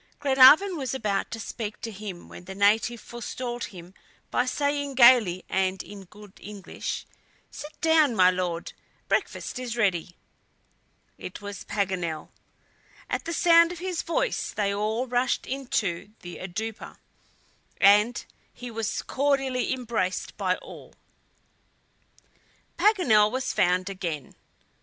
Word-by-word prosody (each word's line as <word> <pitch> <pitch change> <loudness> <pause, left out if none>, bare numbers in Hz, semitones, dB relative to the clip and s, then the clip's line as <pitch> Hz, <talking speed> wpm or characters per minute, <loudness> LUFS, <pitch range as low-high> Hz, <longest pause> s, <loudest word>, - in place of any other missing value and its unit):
Glenarvan 290 +7 +6
was 270 -2 -3
about 210 -5 -1
to 230 - -6
speak 215 0 -6
to 225 - -5
him 195 -4 -8
when 175 - -12
the 190 +1 -8
native 215 +4 +2
forestalled 240 +1 -5
him 180 -1 -12 0.4
by 250 - +1
saying 285 0 -1
gayly 235 -8 +6
and 190 -1 0
in 200 -1 -11
good 210 +1 -15
English: 205 -1 -6 0.5
"Sit 300 +1 -10
down, 320 -6 +4
my 185 -2 +6
Lord; 180 -2 -3 0.3
breakfast - - -2
is 240 -2 -5
ready." 180 -5 0 1.0
It 180 - -8
was 205 -2 -8
Paganel. 185 -6 -2 0.8
At - - -2
the 335 - -3
sound 335 0 +5
of 355 - -7
his 360 0 -3
voice - - -1
they 200 -2 -1
all 215 +4 -1
rushed 245 0 0
into 215 -8 -3
the 175 0 -8
"oudoupa," 210 +5 -6 0.8
and 210 +4 +4 0.3
he 245 -1 -9
was 225 -1 -3
cordially 270 -2 0
embraced 235 -8 -2
all 185 -2 -3
round. - - -21 1.8
Paganel 255 - +4
was 260 +3 -2
found 180 +1 +2
again. 170 -8 -5
220 Hz, 125 wpm, -26 LUFS, 190-260 Hz, 1.8 s, Glenarvan